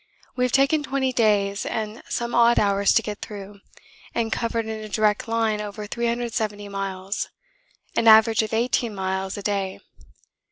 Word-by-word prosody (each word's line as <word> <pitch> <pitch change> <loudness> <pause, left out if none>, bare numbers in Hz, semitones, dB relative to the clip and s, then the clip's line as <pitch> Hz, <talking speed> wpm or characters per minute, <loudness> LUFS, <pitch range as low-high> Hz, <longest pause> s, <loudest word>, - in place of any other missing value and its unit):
We 250 - 0
have 250 - -1
taken 275 +4 +3
twenty 270 -2 -1
days 205 -3 +2
and 220 0 -4
some 235 0 -2
odd 235 0 +5
hours 200 -1 +3
to 225 - +3
get 210 -1 -6
through, 200 -1 -8 0.6
and 225 -1 0
covered 230 0 -1
in 220 0 -4
a 215 - -8
direct 210 0 +1
line 225 -2 0
over 210 0 -6
370 230 -2 -2
miles 195 0 -4 0.7
an 230 - +2
average 220 0 +7
of 220 - -4
18 230 -1 0
miles 190 0 -2
a 205 - -6
day. 195 -2 -2
215 Hz, 160 wpm, -24 LUFS, 200-235 Hz, 0.7 s, average